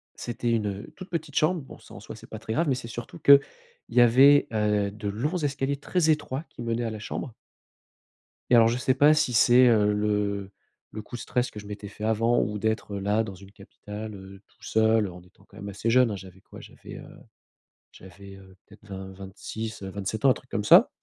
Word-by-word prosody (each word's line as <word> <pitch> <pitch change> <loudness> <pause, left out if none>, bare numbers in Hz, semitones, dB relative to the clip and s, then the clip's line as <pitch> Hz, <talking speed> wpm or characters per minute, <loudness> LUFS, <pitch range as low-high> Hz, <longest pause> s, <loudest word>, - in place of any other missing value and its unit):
c'était 120 0 -3
une, 110 -2 0
heu, 100 0 -7
toute 185 0 -10
petite 160 -4 -5
chambre. 160 +3 +2
Bon, 135 - -12
ça - - -16
en - - -10
soi, - - -9
c'est - - -14
pas - - -8
très - - -7
grave, 165 +6 0
mais 135 - +2
c'est 125 -2 -7
surtout 120 +1 -8
qu'il 140 0 +8 0.5
y 125 - +4
avait, 135 +5 +6
heu, 105 -2 0
de 105 0 -7
longs 120 - -2
escaliers 140 -3 -2
très 160 +3 0
étroits, 150 -2 0
qui - - -12
menaient 115 0 -2
à 115 - -2
la 110 -1 -7
chambre 110 +3 -6 1.2
et 125 - +5
alors, 115 -1 +6
je 115 +1 0
sais 130 +1 +1
pas 145 +3 +6
si 140 -5 +1
c'est, 120 +2 +6
heu, 105 -3 +3
le 105 -1 -1 0.4
le 110 - -6
coup 115 - -10
de 120 - -6
stress 125 0 -1
que 105 - -9
je 100 - -13
m'étais 105 0 -7
fait 105 +1 -11
avant 115 +2 +2
ou 105 +1 -3
d'être, 110 -1 -2
heu, - - -3
là 105 +3 +1
dans 100 -3 -7
une 100 +1 -15
capitale, 105 +1 -9
heu, 95 0 -12
tout - - -33
seul 110 -1 +2
en 90 -1 -10
étant 90 - -23
quand - - -20
même 100 - -7
assez 100 +4 -3
jeune, 125 -1 +4
hein. - - -3
J'avais 95 0 -13
quoi - - -14
j'avais, - - -12
heu - - -11 0.9
j'avais, 95 +1 -13
heu, 95 -1 -17
peut-être 105 +1 -19
20-26-27 100 +2 -6
ans, 135 - +7
un - - +7
truc 130 - -12
comme 105 - -2
ça - - +7
110 Hz, 225 wpm, -26 LUFS, 100-125 Hz, 1.2 s, qu'il